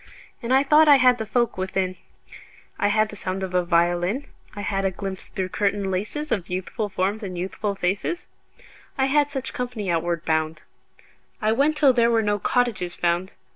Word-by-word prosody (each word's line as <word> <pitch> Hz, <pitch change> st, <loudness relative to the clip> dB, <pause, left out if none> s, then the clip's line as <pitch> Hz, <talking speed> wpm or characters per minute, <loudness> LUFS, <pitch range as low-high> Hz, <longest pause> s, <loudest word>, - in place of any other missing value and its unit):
And 235 Hz, -, -4 dB
I 265 Hz, +1 st, +5 dB
thought 300 Hz, +2 st, +5 dB
I 290 Hz, -, +9 dB
had 250 Hz, -2 st, +4 dB
the 220 Hz, -, -4 dB
folk 235 Hz, -3 st, 0 dB
within: 185 Hz, 0 st, -1 dB, 0.8 s
I 205 Hz, -, +3 dB
had 215 Hz, +1 st, +2 dB
the 210 Hz, -, -9 dB
sound 190 Hz, -1 st, -4 dB
of 185 Hz, -1 st, -4 dB
a 180 Hz, 0 st, +2 dB
violin; 175 Hz, +8 st, +1 dB, 0.3 s
I 205 Hz, -, -5 dB
had 195 Hz, -1 st, -1 dB
a 195 Hz, -, +2 dB
glimpse 190 Hz, 0 st, -6 dB
through 185 Hz, -1 st, -3 dB
curtain 200 Hz, -1 st, 0 dB
laces 215 Hz, +11 st, -3 dB
Of 185 Hz, -5 st, -1 dB
youthful 185 Hz, +4 st, -3 dB
forms 195 Hz, +3 st, -1 dB
and 185 Hz, -4 st, -5 dB
youthful 200 Hz, +3 st, -3 dB
faces. 195 Hz, -, -2 dB, 0.7 s
I 265 Hz, -, +3 dB
had 290 Hz, +1 st, +2 dB
such 270 Hz, -2 st, -5 dB
company 235 Hz, -7 st, -3 dB
outward 170 Hz, -1 st, -1 dB
bound. 160 Hz, 0 st, -1 dB, 0.8 s
I 215 Hz, 0 st, +1 dB
went 285 Hz, +6 st, +2 dB
till 280 Hz, -4 st, +5 dB
there 235 Hz, -1 st, +3 dB
were 225 Hz, -1 st, +2 dB
no 205 Hz, 0 st, 0 dB
cottages 215 Hz, -6 st, 0 dB
found. 175 Hz, +2 st, 0 dB
205 Hz, 185 wpm, -24 LUFS, 185-245 Hz, 0.8 s, I